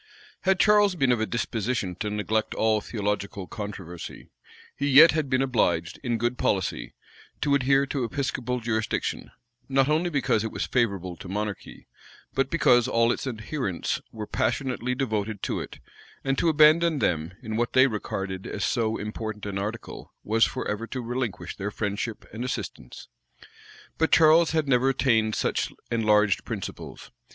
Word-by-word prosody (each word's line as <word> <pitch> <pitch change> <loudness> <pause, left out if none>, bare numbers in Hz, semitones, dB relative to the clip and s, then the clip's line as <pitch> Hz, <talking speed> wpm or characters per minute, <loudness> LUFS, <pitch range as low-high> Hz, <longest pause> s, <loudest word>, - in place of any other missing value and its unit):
Had 190 0 +3
Charles 205 -2 +5
been 135 -6 +2
of 120 -3 +1
a 110 - 0
disposition 115 -3 -2
to 105 - -2
neglect 105 +1 -1
all 110 -1 +2
theological 105 -3 -3
controversy, 95 -5 -8 0.4
he 140 - -1
yet 150 +4 +8
had 155 -3 -1
been 130 +1 +2
obliged, 90 -10 0
in 120 -3 -1
good 120 +2 -1
policy, 95 -2 -1 0.5
to 145 0 +2
adhere 135 0 +3
to 135 -1 -2
episcopal 125 0 -2
jurisdiction; 110 -2 -2 0.4
not 135 +1 +3
only 160 +4 +2
because 135 -8 +1
it 110 - -3
was - - -2
favorable 100 -8 -1
to 100 -4 -10
monarchy, 105 0 -5 0.5
but 135 0 +1
because 120 -8 +4
all 115 0 +3
its 135 - -3
adherents 110 - -3
were 110 -2 -6
passionately 125 +2 -1
devoted 110 -5 -2
to - - -1
it; - - -7 0.5
and 135 0 +1
to 165 - +2
abandon 155 +1 +5
them, 85 - 0
in 110 -1 -4
what 120 +1 -1
they 130 0 +7
regarded 95 -5 -3
as 105 - -2
so 115 -3 0
important 105 0 -5
an 100 -1 -3
article, 110 +4 -6
was 110 +2 +2
forever 115 -3 -3
to 130 - -5
relinquish 115 -8 -3
their 100 +1 -3
friendship 105 +2 -4
and 115 +3 -4
assistance. 125 - -6 0.9
But 160 - +2
Charles 160 +1 +6
had 155 -2 0
never 130 0 +3
attained 115 -5 +2
such - - -1 0.2
enlarged 105 -3 +3
principles. - - -7
115 Hz, 155 wpm, -26 LUFS, 105-135 Hz, 0.9 s, yet